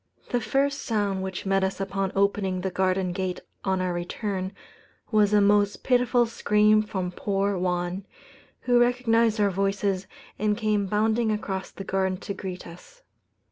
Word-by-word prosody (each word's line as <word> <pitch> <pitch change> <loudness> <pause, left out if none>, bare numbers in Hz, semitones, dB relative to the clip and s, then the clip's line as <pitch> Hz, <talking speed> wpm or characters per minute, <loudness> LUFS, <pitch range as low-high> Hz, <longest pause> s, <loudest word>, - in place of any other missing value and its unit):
The 245 - +1
first 275 +5 0
sound 205 -4 -1
which 190 0 -5
met 195 0 +2
us 190 0 -1
upon 195 0 -2
opening 195 -2 +1
the 190 0 -2
garden 185 0 0
gate 185 0 -3 0.2
on 190 -1 0
our 180 -1 -1
return, 185 +2 -3 0.6
was 210 -2 +4
a 210 -1 +5
most 205 0 +3
pitiful 250 -1 +3
scream 215 -1 +3
from 190 -4 -3
poor 200 +2 -1
Juan, 180 +1 -2 0.5
who 245 -1 +3
recognized 235 -2 +3
our 205 -1 +3
voices 195 0 -1 0.3
and 210 0 +1
came 210 -3 0
bounding 220 +3 +1
across 195 -3 -3
the 195 - -8
garden 190 -1 0
to 200 - -4
greet 185 -2 -6
us. - - -14
200 Hz, 155 wpm, -26 LUFS, 190-215 Hz, 0.6 s, a